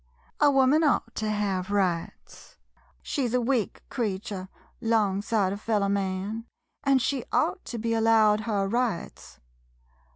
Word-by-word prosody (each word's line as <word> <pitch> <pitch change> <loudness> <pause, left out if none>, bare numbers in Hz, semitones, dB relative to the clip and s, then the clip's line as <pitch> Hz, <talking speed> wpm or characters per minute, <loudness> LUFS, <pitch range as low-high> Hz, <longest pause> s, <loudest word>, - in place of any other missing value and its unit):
A 295 - +6
woman 275 +3 +4
ought 275 -5 +1
to 215 -1 -1
hev 200 -3 -1
rights 185 -5 -3 0.2
— - - -34
she 275 -4 -1
's 240 - -2
a - - +3
weak 240 -3 -1
creeture, 195 -5 -3 0.3
'long 215 -4 +1
side 205 -3 0
of 200 - -7
feller 210 -3 +1
man, 200 +3 -2 0.4
an' 275 -1 +4
she 260 +1 -1
ought 370 - +1
to 240 - -5
be 230 +1 -1
al 225 - +1
lowed 220 -2 +4
her 200 -3 0
rights. 220 - -3
215 Hz, 155 wpm, -27 LUFS, 200-240 Hz, 0.4 s, A